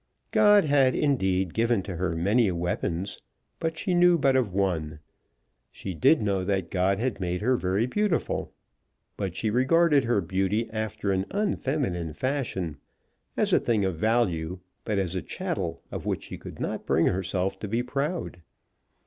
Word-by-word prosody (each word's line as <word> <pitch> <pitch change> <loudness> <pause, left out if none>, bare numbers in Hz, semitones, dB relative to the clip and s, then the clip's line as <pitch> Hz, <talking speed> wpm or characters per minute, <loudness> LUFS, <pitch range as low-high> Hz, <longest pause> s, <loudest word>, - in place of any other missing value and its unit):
God 205 -3 +6
had, 140 -3 +3
indeed, 95 - +1
given 115 -3 +1
to 90 -3 -6
her 85 -1 -1
many 100 +6 +2
weapons, 85 +1 -2 0.4
but 160 -1 -2
she 185 +2 -1
knew 175 0 +5
but 135 -3 +3
of 125 -7 +1
one. 85 -6 -1 0.7
She 95 - -6
did 110 - +4
know 100 -2 0
that 95 -3 -1
God 95 +1 +2
had 120 -1 -2
made 90 0 -2
her 125 +4 +3
very 95 +1 0
beautiful. 200 +5 -1 0.6
But 95 -4 -4
she 110 +1 -1
regarded 140 +4 +4
her 115 -3 +2
beauty 95 +5 0
after 110 -2 -2
an 95 0 0
unfeminine 135 - -1
fashion, 115 - -2 0.6
as - - +1
a - - +6
thing 110 -4 +1
of 95 -3 -1
value, 90 -4 0 0.3
but 105 - -1
as 95 -3 -1
a 95 - -2
chattel 125 - -4
of - - -5
which - - -1
she - - -8
could - - -10
not - - -4
bring 80 - +3
herself 95 +1 -1
to 105 - -5
be 115 +4 0
proud. 140 - -3
100 Hz, 165 wpm, -27 LUFS, 90-130 Hz, 0.7 s, God